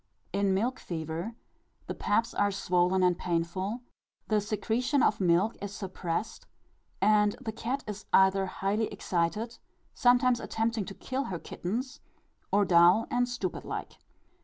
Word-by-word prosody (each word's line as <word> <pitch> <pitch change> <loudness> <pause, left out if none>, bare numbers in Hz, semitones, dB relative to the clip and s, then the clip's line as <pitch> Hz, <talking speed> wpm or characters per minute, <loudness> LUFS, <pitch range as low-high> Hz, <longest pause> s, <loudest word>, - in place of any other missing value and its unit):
In 200 -1 +2
milk 240 +6 0
fever 165 +6 -5 0.5
the - - -4
paps 225 +3 0
are 205 - +2
swollen 185 -1 +1
and 180 -1 +4
painful, 180 +7 -2 0.5
the 215 -1 +3
secretion 235 +6 0
of 205 - +2
milk 180 +5 +3
is 205 0 -5
suppressed, 185 -1 -4 0.5
and 210 0 +4
the 240 -4 -4
cat 240 +5 -3
is 210 -1 -7
either 190 0 +4
highly 205 +4 -1
excited 200 +7 -2 0.3
sometimes 245 -1 +4
attempting 225 -2 -1
to 195 - -8
kill 265 +1 -3
her 180 - -3
kittens 245 - -4 0.5
or 205 0 +4
dull 175 +5 +6
and 245 0 +1
stupid 220 -7 -3
like. - - -6
205 Hz, 135 wpm, -29 LUFS, 185-230 Hz, 0.5 s, dull